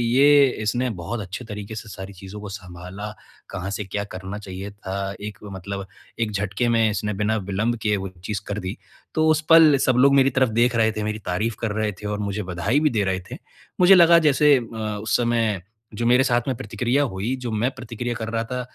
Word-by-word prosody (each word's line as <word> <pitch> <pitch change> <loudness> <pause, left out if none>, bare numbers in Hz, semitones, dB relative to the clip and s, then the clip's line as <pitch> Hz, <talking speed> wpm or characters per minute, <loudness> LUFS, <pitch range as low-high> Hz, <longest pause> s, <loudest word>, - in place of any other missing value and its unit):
ये 145 0 +7 0.2
इसने 120 +4 0
बहुत 90 +8 -4
अच्छे 100 +6 -7
तरीके 105 0 -7
से 110 0 -7
सारी 95 0 -8
चीज़ों 95 +3 -10
को 105 - -7
सँभाला, 95 +2 -8 0.4
कहाँ 95 0 -5
से 105 - -3
क्या 100 +2 -3
करना 95 0 -7
चाहिए 95 0 -7
था, 100 -1 -4
एक 105 -1 -6
मतलब 100 0 -6 0.3
एक 115 -2 0
झटके 105 +3 -1
में 115 -2 +3
इसने 105 0 -2
बिना 105 +2 0
विलंब 100 +4 -1
के 105 -1 +2
वो 95 0 -4 0.2
चीज़ 105 -1 -3
कर 105 +1 -3
दी। 95 +5 -5 0.4
तो 155 0 +3
उस 155 0 +3
पल 160 -3 +8
सब 130 - +3
लोग 140 +2 +6
मेरी 135 0 +5
तरफ़ 130 -2 +2
देख 120 +2 +2
रहे 110 -1 +3
थे, 110 -1 -4
मेरी 105 0 -3
तारीफ़ 100 +5 -1
कर 110 -2 -1
रहे 110 0 -1
थे 105 - -4
और 105 0 -2
मुझे 105 0 -2
बधाई 90 +9 0
भी 150 0 +3
दे 110 -4 0
रहे 95 -1 0
थे। - - -5 0.4
मुझे 185 +2 +8
लगा 170 -1 +7
जैसे 150 -2 +5
अ, 115 -2 -6 0.2
उस 110 - 0
समय 115 -5 +1 0.3
जो 115 +2 -3
मेरे 125 +2 +5
साथ 120 -2 +2
में 130 - 0
प्रतिक्रिया 120 +7 0
हुई, 115 0 -2
जो 125 -2 -5
मैं 115 +5 0
प्रतिक्रिया 120 -1 -4
कर 110 -1 -4
रहा 115 0 -1
था 125 +2 -4
110 Hz, 220 wpm, -23 LUFS, 100-125 Hz, 0.4 s, पल